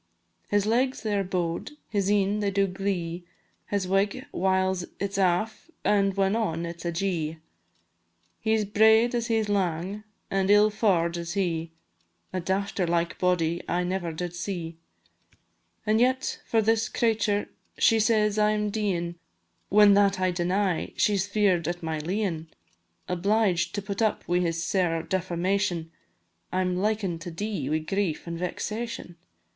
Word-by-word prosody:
His 205 -1 +2
legs 250 +4 +1
they 215 -2 0
are 200 - +1
bow'd, 180 - -2
his 200 -3 0
een 205 0 +2
they 205 -1 +1
do 200 0 +2
glee, 180 -3 -3 0.4
His 200 -2 -1
wig, 200 +7 +1
whiles 190 0 +1 0.2
it 200 0 -2
's 200 - -2
aff, 195 - 0 0.2
and 195 -2 +3
when 195 +1 +2
on, 170 -7 -1
it 170 0 -7
's - - -10
ajee; 170 -2 -1 1.0
He 220 0 +2
's 215 - 0
braid 220 +3 +5
as 235 -1 -1
he 225 - +2
's 215 - -1
lang, 190 0 -1 0.3
an' 195 0 +1
ill 210 +1 +6
faur'd 175 -6 +1
is 170 0 -4
he, 170 -4 -1 0.6
A 185 - -1
dafter 190 0 -1
like 170 0 0
body 175 -2 +1
I 180 +1 +1
never 180 -1 -2
did 175 +2 -4
see. 175 -2 -5 1.1
An' 215 +1 +3
yet 255 +2 +1
for 225 -1 +2
this 225 +1 +2
cratur' 215 -3 +1 0.3
she 225 - +4
says 215 -1 +2
I 210 0 +4
am 210 -1 -1
deein', 175 -5 -1 0.5
When 205 0 +7
that 200 -1 +3
I 185 0 +2
deny, 180 +1 0
she 210 - +3
's 190 0 0
fear'd 195 -6 +2
at 175 0 -3
my 160 -1 -2
leein'; 170 -1 -2 0.6
Obliged 180 -1 +1
to 205 - -3
put 200 +1 -4
up 220 -1 0
wi' 175 +1 +2
this 165 -1 -1
sair 175 -5 0
defamation, 180 -1 -1 0.6
I'm 185 0 0
liken 195 -3 -1
to 170 - -6
dee 175 -4 -3
wi' 155 - +2
grief 170 +1 -2
an' 170 - -3
vexation. 215 +1 -4
190 Hz, 160 wpm, -27 LUFS, 175-210 Hz, 1.1 s, When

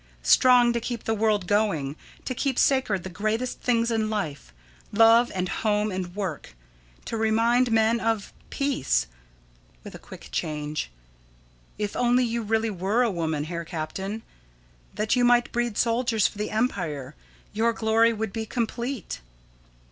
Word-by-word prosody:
Strong 245 - +5
to 235 - 0
keep 235 -1 -4
the 225 - 0
world 215 -3 +1
going, 180 -9 0 0.3
to 255 - -2
keep 265 0 -1
sacred 240 -9 +2
the 190 - -6
greatest 215 +6 -2
things 235 -1 +1
in 220 -1 0
life 155 - -4 0.4
love 230 +2 +5
and 185 0 -1
home 210 +2 0
and 185 -1 -5
work. 180 - -5 0.5
To 225 - -3
remind 230 +3 +2
men 225 +1 +3
of 225 -3 -1 0.2
peace. 275 - 0 0.8
[With - - -10
a - - -9
quick - - -12
change.] 150 - -3 0.9
If 205 -1 -3
only 245 +1 +3
you 235 0 -2
really 220 +1 0
were 200 +6 +1
a 235 - +1
woman, 160 -4 -2
Herr 170 +2 -4
Captain, 190 +6 -5 0.7
that 215 +2 +1
you 245 - +2
might 240 0 +4
breed 240 -3 -1
soldiers 230 -3 +1
for 210 - -1
the 210 - -2
empire, 170 - -2 0.4
your 225 +2 +2
glory 225 0 +3
would 220 -2 -4
be 220 -1 -4
complete. 235 - -3
220 Hz, 150 wpm, -25 LUFS, 190-235 Hz, 0.9 s, Strong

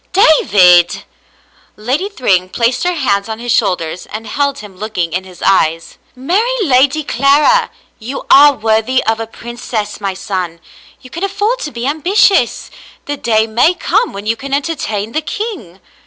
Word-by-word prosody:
"David! 185 - +4 0.4
" - - -34
Lady 265 - -2
Thryng 185 - 0
placed 240 +5 0
her 360 0 0
hands 205 -8 -1
on 220 - -4
his 240 +1 -4
shoul 205 -6 +2
ders 165 +1 -7
and 220 +1 -7
held 280 +1 -1
him, 210 -5 -11
looking 185 -5 -4
in 185 +1 -3
his 185 -2 -12
eyes. 165 -4 +1
" - - -37
Marry 360 - 0
Lady 280 0 +2
Clara. 290 - +3 0.3
You 245 +5 -6
are 290 +1 +8
worthy 225 +2 0
of 225 0 0
a 225 - -4
princess, 225 -3 -6
my 195 -2 -3
son. 185 -4 -4 0.4
You 255 - -15
can 340 - -6
afford 410 +5 -1
to 300 - -5
be 235 +1 -5
ambitious. 315 - +1 0.3
The 290 - -3
day 220 -5 +1
may 240 +11 +2
come 425 +6 0
when 200 +1 -8
you 225 +1 0
can 275 +4 -3
entertain 230 -9 -3
the 310 - -1
king." 320 - -6
240 Hz, 170 wpm, -14 LUFS, 205-295 Hz, 0.4 s, are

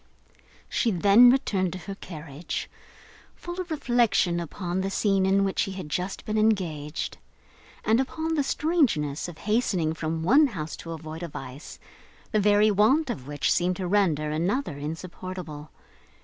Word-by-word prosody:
She 235 - +1
then 205 +5 +7
returned 195 - +1
to - - -5
her 200 - -5
carriage: 160 -4 -6 0.7
full 350 +1 -6
of 360 - -8
reflection 240 - +2
upon 175 +2 -3
the 195 - -1
scene 195 -1 +2
in 195 +1 +3
which 195 -1 -1
she 195 - 0
had 185 -5 -7
just 180 +5 -3
been 215 0 0
engaged, 170 -9 -1 0.7
and 225 +2 +4
upon 320 +5 -2
the 305 - +2
strangeness 270 - +1
of 175 -3 -9
hastening 195 -6 0
from 160 0 -3
one 280 - +6
house 160 - -5
to 165 - -7
avoid 160 0 -8
a 170 - -3
vice 135 -1 -9 0.5
the 215 - +2
very 210 +1 +4
want 245 +9 +3
of 130 - -7
which 145 0 0
seemed 180 +1 +1
to 185 - -4
render 170 -6 +1
another 175 - -1
insupportable! 160 0 -7
185 Hz, 155 wpm, -26 LUFS, 160-215 Hz, 0.7 s, then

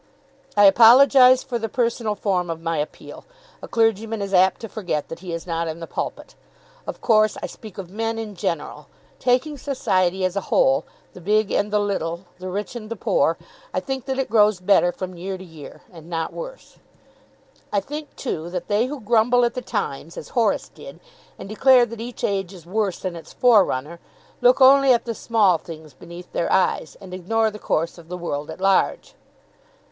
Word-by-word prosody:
"I 205 - +6
apologise 250 +5 +7
for 245 -3 -3
the 225 0 -3
personal 230 -2 -1
form 185 -4 -1
of 165 -1 -4
my 165 -1 -2
appeal. 150 - -7 0.4
A - - -8
clergyman 225 -1 0
is 200 -1 -4
apt 185 0 +4
to 225 - -5
forget 180 -9 -4
that 165 - -7
he 180 -1 -8
is 165 0 -5
not 165 -1 -2
in 160 +1 -5
the 165 - -6
pulpit. - - -6 0.5
Of - - -6
course 215 -2 +3
I - - 0
speak 215 -3 -11
of 185 -3 -8
men 225 +2 -2
in 220 -2 -5
general. 150 -5 -4 0.3
Taking 260 +4 0
society 190 -9 0
as 185 +1 -2
a 200 - 0
whole, 135 0 +3 0.3
the 180 - -12
big 210 +3 +1
and 205 0 0
the 210 - +2
little, 185 -3 -2
the 185 +1 -6
rich 205 +5 -4
and 215 -3 -7
the 230 - -4
poor, - - +1 0.4
I - - +2
think 265 -3 -5
that 265 -1 -3
it 270 - -1
grows 210 -3 +4
better 180 -1 +3
from 185 0 -7
year 190 +2 -5
to 185 - -11
year, 160 -5 -12
and 165 -1 -13
not 165 -1 -3
worse. - - -9 0.9
I 205 - +2
think, 295 +8 -8
too, 170 - -4
that 175 -1 -5
they 210 +4 +2
who 285 -1 -6
grumble 240 +3 +3
at 235 - -1
the 250 - -4
times, 170 - -4
as - - -8
Horace 230 -5 0
did, - - -12 0.4
and - - -9
declare 250 +4 +5
that 230 -1 -9
each 240 +1 -8
age 195 -2 -1
is 170 -3 -14
worse 200 0 -1
than 185 -2 -4
its 165 - -11
forerunner, 170 - +2 0.4
look 250 +2 +4
only 270 0 +7
at 240 - 0
the 230 - -3
small 210 -7 +2
things 155 -3 -11
beneath 170 +5 -12
their 170 - -1
eyes, 185 -3 +1
and 190 -2 -11
ignore 220 +5 0
the 210 - -10
course 165 -1 -2
of 165 - -15
the 180 - -5
world 150 -3 -4
at 160 - -8
large." 195 0 +1
200 Hz, 200 wpm, -22 LUFS, 175-230 Hz, 0.9 s, apologise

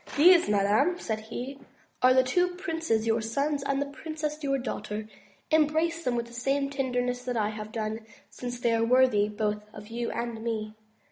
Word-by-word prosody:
These, 340 - +7
madame," 210 - +3
said 220 -9 -3
he, 250 +5 -6 0.4
"are 255 - +6
the 260 - +6
two 355 +7 +1
princes, 325 - -1
your 225 0 +2
sons, 280 +6 -1
and 275 0 0
the 285 - 0
princess, 305 +1 -5
your 275 -1 +1
daughter; 215 -4 -4 0.4
embrace 315 +2 +2
them 250 -4 0
with 235 0 -1
the 235 - -14
same 275 +3 0
tenderness 250 -2 -1
that 250 -2 -1
I 210 -1 +1
have 215 0 -7
done, 220 -1 -3 0.3
since 245 +3 -6
they 235 -1 +2
are 230 0 +2
worthy 235 -4 +4
both 210 0 -2
of 210 0 -10
you 235 +1 -3
and 235 0 -3
of 220 - -9
me." 215 -2 -3
245 Hz, 190 wpm, -28 LUFS, 220-285 Hz, 0.4 s, These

